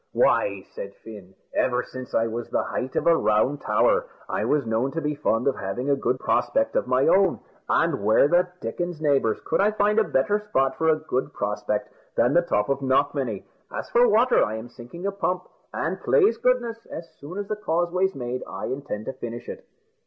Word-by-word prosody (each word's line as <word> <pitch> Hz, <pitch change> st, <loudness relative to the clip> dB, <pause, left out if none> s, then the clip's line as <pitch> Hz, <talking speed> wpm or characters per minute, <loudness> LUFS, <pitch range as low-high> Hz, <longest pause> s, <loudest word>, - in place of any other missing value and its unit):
"Why," -, -, +2 dB
said -, -, -7 dB
Fin, 100 Hz, -4 st, -11 dB, 0.2 s
"ever 125 Hz, -1 st, +1 dB
since 130 Hz, -1 st, -8 dB
I 115 Hz, -, +3 dB
was 115 Hz, +1 st, -4 dB
the -, -, 0 dB
height 130 Hz, +1 st, -4 dB
of -, -, 0 dB
a 170 Hz, -, +6 dB
round 130 Hz, +2 st, +1 dB
tower, -, -, +2 dB, 0.2 s
I -, -, -1 dB
was 145 Hz, -3 st, +1 dB
known 115 Hz, +4 st, 0 dB
to 165 Hz, -, -1 dB
be 150 Hz, -1 st, -1 dB
fond 135 Hz, -4 st, 0 dB
of 135 Hz, -, +2 dB
having 120 Hz, +9 st, -2 dB
a -, -, +4 dB
good 130 Hz, -2 st, 0 dB
prospect 275 Hz, -, +1 dB
of -, -, +1 dB
my 130 Hz, +1 st, +3 dB
own; 190 Hz, -2 st, +4 dB, 0.3 s
and -, -, +1 dB
where 110 Hz, +6 st, +5 dB
the 175 Hz, +3 st, +3 dB
dickens, 175 Hz, +8 st, -4 dB
neighbours, 140 Hz, -8 st, +2 dB
could -, -, +1 dB
I 205 Hz, -, +4 dB
find 210 Hz, 0 st, +2 dB
a -, -, +4 dB
better 205 Hz, +5 st, +1 dB
spot 135 Hz, -11 st, 0 dB
for 160 Hz, -, +1 dB
a 160 Hz, -, +5 dB
good 145 Hz, -3 st, -2 dB
prospect 105 Hz, 0 st, -2 dB, 0.2 s
than 120 Hz, +4 st, +3 dB
the 175 Hz, -, +5 dB
top 105 Hz, -12 st, 0 dB
of 140 Hz, -1 st, 0 dB
Knockmany? 135 Hz, -5 st, 0 dB, 0.3 s
As -, -, -6 dB
for 240 Hz, +1 st, +5 dB
water, 240 Hz, +4 st, +4 dB
I 110 Hz, -, -2 dB
am 110 Hz, +2 st, -7 dB
sinking 125 Hz, +10 st, -10 dB
a 200 Hz, -, +1 dB
pump, 180 Hz, -2 st, -2 dB, 0.2 s
and, -, -, -3 dB
plase 430 Hz, -2 st, +3 dB
goodness, 240 Hz, -2 st, 0 dB
as 165 Hz, +1 st, -7 dB
soon 155 Hz, +7 st, -8 dB
as 205 Hz, -1 st, -4 dB
the 215 Hz, -, -2 dB
Causeway's 180 Hz, 0 st, 0 dB
made, 125 Hz, 0 st, -4 dB
I -, -, -5 dB
intend 130 Hz, -6 st, -4 dB
to 135 Hz, -, -4 dB
finish 120 Hz, -2 st, -7 dB
it." -, -, -8 dB
140 Hz, 205 wpm, -25 LUFS, 120-185 Hz, 0.3 s, a